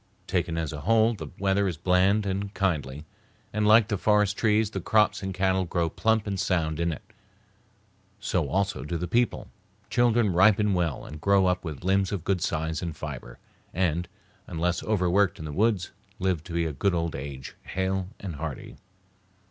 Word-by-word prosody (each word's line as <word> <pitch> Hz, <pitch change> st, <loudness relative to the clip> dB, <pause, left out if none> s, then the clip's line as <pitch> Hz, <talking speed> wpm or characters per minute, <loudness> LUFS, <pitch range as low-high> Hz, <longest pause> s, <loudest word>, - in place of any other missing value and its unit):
Taken 80 Hz, -, -1 dB
as 80 Hz, -2 st, -2 dB
a 75 Hz, -, -6 dB
whole, 115 Hz, +5 st, +3 dB
the 105 Hz, -, -7 dB
weather 100 Hz, +1 st, +1 dB
is 85 Hz, -4 st, -3 dB
bland 95 Hz, +4 st, +3 dB
and 100 Hz, +1 st, -2 dB
kindly, 75 Hz, -6 st, -1 dB, 0.5 s
and 105 Hz, 0 st, +1 dB
like 110 Hz, 0 st, +6 dB
the 105 Hz, -3 st, -2 dB
forest 105 Hz, -1 st, +3 dB
trees 110 Hz, -1 st, +2 dB
the -, -, -4 dB
crops 105 Hz, -1 st, +2 dB
and 95 Hz, -1 st, -3 dB
cattle 95 Hz, 0 st, +1 dB
grow 85 Hz, -2 st, -1 dB
plump 110 Hz, -1 st, +1 dB
and 100 Hz, -2 st, -3 dB
sound 80 Hz, -4 st, 0 dB
in 85 Hz, 0 st, +1 dB
it. 80 Hz, -, -9 dB, 1.1 s
So -, -, -1 dB
also 100 Hz, -8 st, -1 dB
do 85 Hz, +4 st, -3 dB
the 90 Hz, +2 st, -3 dB
people; 120 Hz, +7 st, 0 dB, 0.4 s
children 120 Hz, -4 st, +3 dB
ripen 105 Hz, +2 st, +4 dB
well 85 Hz, -7 st, -1 dB
and 75 Hz, 0 st, -9 dB
grow 100 Hz, +1 st, +4 dB
up 90 Hz, 0 st, +1 dB
with 80 Hz, -4 st, -6 dB
limbs 95 Hz, 0 st, +2 dB
of 100 Hz, -6 st, -3 dB
good 95 Hz, -1 st, 0 dB
size 80 Hz, 0 st, -1 dB
and 85 Hz, -3 st, -5 dB
fiber 65 Hz, -6 st, -7 dB, 0.4 s
and, 85 Hz, -1 st, 0 dB, 0.4 s
unless 85 Hz, +1 st, -1 dB
overworked 95 Hz, -2 st, +2 dB
in 80 Hz, -, -7 dB
the 75 Hz, -, -5 dB
woods, 105 Hz, -1 st, +1 dB, 0.3 s
live 90 Hz, -4 st, -1 dB
to 85 Hz, -2 st, -1 dB
a 80 Hz, -, -4 dB
good 95 Hz, +6 st, +1 dB
old 85 Hz, -1 st, -1 dB
age, 65 Hz, -1 st, -7 dB
hale 95 Hz, 0 st, -2 dB
and 90 Hz, -7 st, -6 dB
hearty. 75 Hz, -2 st, -6 dB
95 Hz, 180 wpm, -27 LUFS, 80-100 Hz, 1.1 s, like